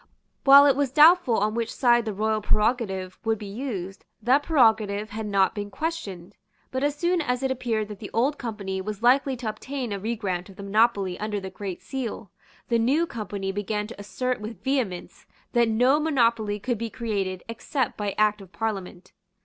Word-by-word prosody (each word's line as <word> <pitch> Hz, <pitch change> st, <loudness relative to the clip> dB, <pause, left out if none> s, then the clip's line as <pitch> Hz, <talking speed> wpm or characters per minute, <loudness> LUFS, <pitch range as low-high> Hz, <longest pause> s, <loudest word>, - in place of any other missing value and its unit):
While 280 Hz, +1 st, +9 dB
it 280 Hz, -2 st, +5 dB
was 280 Hz, -2 st, 0 dB
doubtful 310 Hz, -4 st, +6 dB
on 210 Hz, +1 st, +1 dB
which 230 Hz, 0 st, -2 dB
side 240 Hz, -3 st, +3 dB
the 220 Hz, -, -2 dB
royal 215 Hz, +1 st, 0 dB
prerogative 210 Hz, -4 st, 0 dB
would 225 Hz, -1 st, +1 dB
be 210 Hz, -, -8 dB
used, 200 Hz, -3 st, -5 dB, 0.2 s
that 255 Hz, +6 st, +3 dB
prerogative 220 Hz, -8 st, +2 dB
had 215 Hz, 0 st, -4 dB
not 195 Hz, -2 st, +2 dB
been 205 Hz, -2 st, -5 dB
questioned. 205 Hz, -, -5 dB, 0.4 s
But 260 Hz, +1 st, -2 dB
as 290 Hz, 0 st, +1 dB
soon 345 Hz, +3 st, +1 dB
as 250 Hz, -3 st, -1 dB
it 265 Hz, -, +1 dB
appeared 230 Hz, -4 st, -1 dB
that 210 Hz, -2 st, -8 dB
the 205 Hz, -, -7 dB
Old 275 Hz, +6 st, +1 dB
Company 200 Hz, -5 st, -4 dB
was 210 Hz, +2 st, -6 dB
likely 265 Hz, +2 st, +4 dB
to 240 Hz, -2 st, -5 dB
obtain 250 Hz, +1 st, -5 dB
a 200 Hz, -, -3 dB
regrant 200 Hz, -4 st, -3 dB
of 195 Hz, -, -13 dB
the 200 Hz, -, -9 dB
monopoly 200 Hz, -2 st, +2 dB
under 210 Hz, -1 st, -2 dB
the 190 Hz, -1 st, -7 dB
Great 190 Hz, -2 st, -6 dB
Seal, 235 Hz, -7 st, -5 dB, 0.4 s
the 235 Hz, -1 st, +2 dB
New 275 Hz, +9 st, +2 dB
Company 205 Hz, -7 st, -4 dB
began 210 Hz, +1 st, -2 dB
to 220 Hz, 0 st, -10 dB
assert 250 Hz, +4 st, -3 dB
with 215 Hz, -2 st, -8 dB
vehemence 245 Hz, -10 st, -2 dB, 0.3 s
that 235 Hz, -2 st, +3 dB
no 250 Hz, +6 st, +3 dB
monopoly 235 Hz, -8 st, +1 dB
could 240 Hz, +1 st, -2 dB
be 230 Hz, 0 st, -3 dB
created 200 Hz, -6 st, -3 dB
except 245 Hz, +4 st, -2 dB
by 205 Hz, -2 st, -3 dB
Act 210 Hz, -1 st, +2 dB
of 190 Hz, -2 st, -14 dB
Parliament. 190 Hz, -2 st, -4 dB
220 Hz, 190 wpm, -25 LUFS, 200-255 Hz, 0.4 s, While